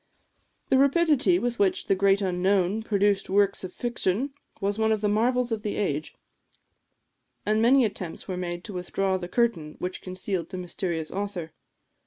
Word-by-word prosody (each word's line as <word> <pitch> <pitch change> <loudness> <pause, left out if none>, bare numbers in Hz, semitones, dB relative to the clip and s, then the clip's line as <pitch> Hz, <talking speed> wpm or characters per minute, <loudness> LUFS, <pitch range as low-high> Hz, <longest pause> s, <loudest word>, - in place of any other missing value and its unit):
The 265 - +4
rapidity 300 +3 +4
with 240 -6 -2
which 200 -2 +2
the - - +3
"Great 195 +1 +3
Unknown" 190 +2 +1
produced 205 -2 +1
works 200 0 +2
of 185 - -5
fiction, 240 +3 -1 0.3
was 200 +1 -1
one 220 0 +3
of 215 -1 +1
the 210 - +2
marvels 240 +4 +1
of 220 -2 -1
the 210 -1 -3
age; 155 -6 -2 1.3
and 215 +1 +2
many 250 +2 +5
attempts 190 -5 -5
were 185 - -3
made 175 -1 -4
to 210 - -7
withdraw 190 +1 -1
the 175 - -5
curtain 180 -8 0
which 180 +1 -4
concealed 185 -2 -4
the 185 - -6
mysterious 175 -3 -3
author. 195 -5 -4
200 Hz, 165 wpm, -26 LUFS, 180-225 Hz, 1.3 s, many